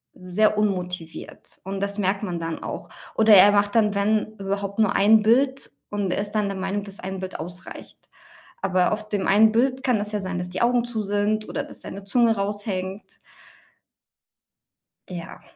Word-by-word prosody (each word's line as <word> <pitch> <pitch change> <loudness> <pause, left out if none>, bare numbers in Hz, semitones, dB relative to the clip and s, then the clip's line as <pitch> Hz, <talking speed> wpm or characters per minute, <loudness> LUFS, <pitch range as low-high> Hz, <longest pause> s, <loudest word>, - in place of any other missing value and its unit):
sehr 210 +4 +1
unmotiviert. 180 -5 -4
Und 195 +1 -5
das 200 +1 -1
merkt 195 +1 0
man 175 -4 -3
dann 165 -1 -5
auch. - - -6 0.3
Oder 220 -1 +6
er 200 +2 +8
macht 205 +1 +1
dann, 210 -2 +3
wenn 215 +2 0
überhaupt 200 +1 -3
nur 215 -3 +3
ein 215 +2 +5
Bild 260 +5 +2 0.2
und 205 -2 -1
er 200 - 0
ist 205 0 -2
dann 210 -2 0
der 195 -1 -4
Meinung, 195 +2 -2
dass 200 -1 -6
ein 190 0 -5
Bild 185 0 -6
ausreicht. 175 +3 -8 0.6
Aber 185 -2 +2
auf 215 0 -6
dem 205 -2 -1
einen 215 +2 +5
Bild 260 +3 +1
kann 250 -4 +2
es 205 0 -2
ja 210 - 0
sein, 185 -2 -4
dass 180 0 -3
die 180 - -3
Augen 240 0 +2
zu 235 -2 -3
sind 205 +1 -1
oder 285 - -3
dass 290 - -10
seine 200 - -7
Zunge 230 +2 +3
raushängt. 200 -1 -3 2.1
Ja. 175 -1 -8
205 Hz, 180 wpm, -24 LUFS, 190-215 Hz, 2.1 s, er